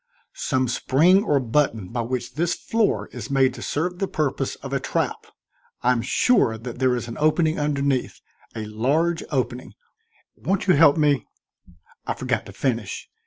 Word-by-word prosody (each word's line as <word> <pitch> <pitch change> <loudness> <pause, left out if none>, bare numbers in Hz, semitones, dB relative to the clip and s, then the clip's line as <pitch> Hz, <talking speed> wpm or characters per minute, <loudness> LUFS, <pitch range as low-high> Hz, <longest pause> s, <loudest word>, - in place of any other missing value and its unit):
"Some 130 -2 0
spring 165 - +3
or 145 -9 +2
button 115 -6 0
by 120 0 -2
which 125 +1 -4
this 170 +3 0
floor 225 -2 0
is - - -8
made 135 -2 +3
to - - -9
serve 180 +4 -2
the 195 - 0
purpose 150 -6 -1
of - - -8
a - - +1
trap. - - -2 0.6
I'm 125 -1 +3
sure 125 - +2
that 120 +1 -8
there 130 -1 +3
is 120 -1 -4
an 115 - -7
opening 155 +1 +2
underneath 140 -3 -1 0.4
a 110 - -4
large 145 +11 0
opening. 125 -3 -2 0.6
Won't 195 0 -1
you 185 - +5
help 145 0 +6
me 145 -7 +2 0.4
" 85 -1 -27
I - - -1
forgot - - -2
to - - -9
finish. 115 -7 -3
135 Hz, 165 wpm, -23 LUFS, 120-155 Hz, 0.6 s, help